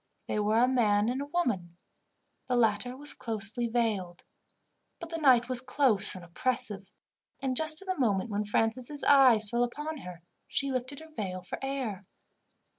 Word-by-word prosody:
They - - -2
were 210 +1 +1
a 245 +2 +5
man 215 -4 +2
and 260 +3 -2
a 285 - -5
woman. 215 - -2 0.7
The 250 - 0
latter 240 +2 +1
was 290 +2 +2
closely 225 0 -1
veiled. 215 -7 -2 0.8
But 335 - -8
the 330 - -3
night 255 -5 +5
was 255 -1 +1
close 255 -7 +3
and 180 -1 -9
oppressive, 205 +1 -2 0.5
and, 265 -2 -2
just 310 +4 -2
at - - -20
the 370 -4 -2
moment 215 -2 +1
when 205 +1 -1
Francis' 230 +7 -1
eyes 250 -7 +5
fell 240 0 +2
upon 295 +6 -4
her, 180 -8 -10 0.2
she 275 -1 -1
lifted 255 +3 -4
her 320 0 -14
veil 185 -4 -4
for - - -6
air. 250 -8 -4
240 Hz, 170 wpm, -29 LUFS, 205-270 Hz, 0.8 s, a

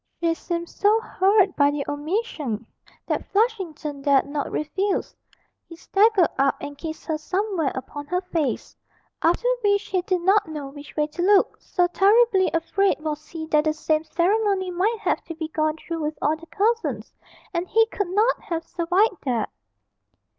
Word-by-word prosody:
She 335 -1 +2
seemed 340 0 -4
so 420 +5 +2
hurt 395 -2 +2
by 285 -1 +4
the 290 -1 -2
omission, 290 - -3 0.4
that - - -1
Flushington 355 - -1
dared 275 -1 +3
not 285 0 -3
refuse; 380 +6 -1 0.5
he 335 - -9
staggered 390 +1 +3
up 275 0 +3
and 285 - -7
kissed 315 +2 -7
her 315 -1 -2
somewhere 365 -3 -1
upon 285 +2 -7
her 360 +3 0
face 330 -6 -2 0.5
after 350 +9 +2 0.2
which 405 0 +2
he 370 -2 +1
did 365 0 -1
not 390 +3 +3
know 300 -3 -6
which 285 +1 -12
way 300 - +2
to 305 +3 -6
look, 395 +2 +3
so 360 - +1
terribly 390 +2 +4
afraid 350 +4 +1
was 305 0 -4
he 325 -2 -6
that 300 0 +4
the 310 - +2
same 310 0 0
ceremony 380 +2 +1
might 395 +6 +1
have - - 0
to 330 - -7
be 315 -1 -5
gone 310 0 0
through 330 0 -5
with 305 0 -3
all 300 +2 +1
the 330 +1 -14
cousins, 455 +5 -1 0.4
and 345 +1 -1
he 450 +3 +4
could 405 -5 -2
not 430 +6 +2
have 330 -1 -3
survived 360 +2 +1
that. 240 -5 -1
340 Hz, 170 wpm, -24 LUFS, 305-395 Hz, 0.5 s, by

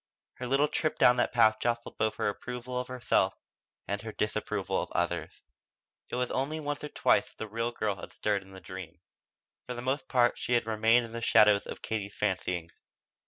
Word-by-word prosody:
Her 125 - -3
little 135 +3 +3
trip 155 +1 -1
down 125 0 +6
that - - +2
path 110 -2 +5
jostled 120 0 -2
both 110 0 +1
her - - -1
approval 125 +4 -4
of 125 - -4
herself 130 -1 +1 0.5
and 100 +1 -2
her 110 0 -6
disapproval 105 0 -1
of - - -6
others. - - -2 0.7
It - - -3
was 125 0 -1
only 150 +4 -1
once 145 -1 -3
or 150 - -4
twice - - +2
that - - -24
the 110 - -5
real 115 +3 -2
girl 105 -4 -1
had - - -9
stirred 105 -2 0
in 95 - -16
the 95 0 -11
dream. 90 -3 -9 0.7
For 125 - -4
the 120 - -6
most 130 +2 -1
part 120 -2 +3
she 125 - -1
had 120 -2 +3
remained 115 +2 +3
in 115 - -11
the 115 0 -5
shadow 105 -2 +6
of - - -8
Katie's 100 -2 -3
fancyings. 90 -4 -2
115 Hz, 205 wpm, -30 LUFS, 105-125 Hz, 0.7 s, down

